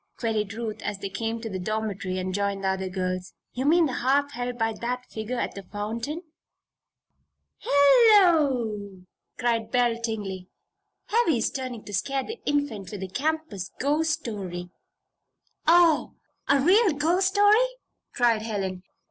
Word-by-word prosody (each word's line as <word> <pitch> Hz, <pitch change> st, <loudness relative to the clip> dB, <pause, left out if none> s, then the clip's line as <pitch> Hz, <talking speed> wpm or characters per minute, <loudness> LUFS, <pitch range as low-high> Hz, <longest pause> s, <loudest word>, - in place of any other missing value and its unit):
queried 215 Hz, -4 st, -1 dB
Ruth, 220 Hz, -1 st, -5 dB
as 205 Hz, -1 st, -3 dB
they 195 Hz, 0 st, -5 dB
came 225 Hz, +4 st, -3 dB
to 225 Hz, -, -5 dB
the 190 Hz, -4 st, -4 dB
dormitory 200 Hz, -2 st, -3 dB
and 185 Hz, 0 st, -3 dB
joined 200 Hz, 0 st, -1 dB
the 190 Hz, -, +2 dB
other 190 Hz, 0 st, -2 dB
girls. 185 Hz, 0 st, -3 dB, 0.2 s
"You 255 Hz, +2 st, -3 dB
mean 335 Hz, +2 st, +5 dB
the 270 Hz, -, -2 dB
harp 280 Hz, +3 st, +1 dB
held 245 Hz, -1 st, -4 dB
by 225 Hz, -1 st, 0 dB
that 250 Hz, +1 st, -3 dB
figure 220 Hz, +3 st, -4 dB
at -, -, -2 dB
the 200 Hz, -, -7 dB
fountain?" 225 Hz, -, -5 dB, 1.4 s
"Hello!" 280 Hz, -, +4 dB, 0.4 s
cried 230 Hz, -2 st, 0 dB
Belle 240 Hz, -1 st, +1 dB
Tingley. 200 Hz, -5 st, -4 dB, 0.6 s
"Heavy's 335 Hz, -, +2 dB
trying 255 Hz, -4 st, -5 dB
to 205 Hz, -, -9 dB
scare 270 Hz, +8 st, -1 dB
the 450 Hz, +2 st, -7 dB
Infant 285 Hz, -10 st, -1 dB
with 205 Hz, -1 st, -7 dB
the 190 Hz, -, -5 dB
campus 275 Hz, -, -2 dB
ghost 300 Hz, +2 st, +1 dB
story." 180 Hz, -5 st, -6 dB, 1.0 s
"Oh! 335 Hz, -2 st, +4 dB, 0.3 s
a 280 Hz, 0 st, +5 dB
real 375 Hz, -, +4 dB
ghost 335 Hz, +6 st, +2 dB
story!" 410 Hz, +3 st, +5 dB, 0.5 s
cried 235 Hz, -4 st, +2 dB
Helen. 195 Hz, -4 st, -3 dB
230 Hz, 145 wpm, -26 LUFS, 200-285 Hz, 1.4 s, mean